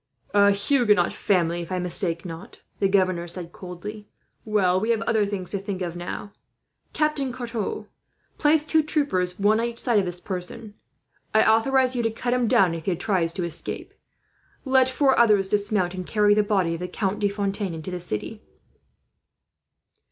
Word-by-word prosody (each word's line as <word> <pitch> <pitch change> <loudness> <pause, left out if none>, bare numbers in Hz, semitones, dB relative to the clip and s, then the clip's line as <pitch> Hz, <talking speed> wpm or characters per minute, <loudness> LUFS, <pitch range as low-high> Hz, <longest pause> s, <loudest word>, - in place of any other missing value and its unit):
"A 200 0 +5
Huguenot 210 +2 +2
family, 175 -4 0
if 170 - -8
I 185 - -1
mistake 175 -1 +1
not," 170 +6 -9 0.2
the 195 - +3
governor 185 -3 +1
said, 170 0 -6
coldly. 205 +4 -9 0.4
"Well, 190 -4 +2
we 220 +4 -2
have 230 -1 +1
other 220 -3 +1
things 195 -3 -4
to 200 - 0
think 195 -1 -4
of, 170 -1 -5
now. 175 +3 -6 0.6
"Captain 300 -4 0
Carton, 235 -4 -4 0.5
place 300 0 +4
two 315 +1 +2
troopers 280 - -1
one 210 +2 +3
on 235 - 0
each 235 -1 -7
side 235 -4 +2
of 195 - 0
this 175 0 0
person. 200 +4 -6 0.6
I 220 - +6
authorize 255 +3 +3
you 245 - 0
to 225 - +1
cut 240 +2 -2
him 250 -2 +1
down, 195 -8 +4
if 165 -1 -6
he 185 - 0
tries 180 -3 0
to 180 - -3
escape. 170 -2 -4 0.7
Let 260 -1 +4
four 265 0 +2
others 210 -5 +4
dismount, 205 -3 +1
and 185 -1 -5
carry 210 +2 +3
the 210 - +3
body 195 -5 0
of 165 - -5
the 180 - -4
Count 195 +2 -2
de 205 -1 +1
Fontaine 200 -2 -2
into 160 +3 -6
the 180 - -4
city. 175 - -5
205 Hz, 180 wpm, -24 LUFS, 180-230 Hz, 0.7 s, I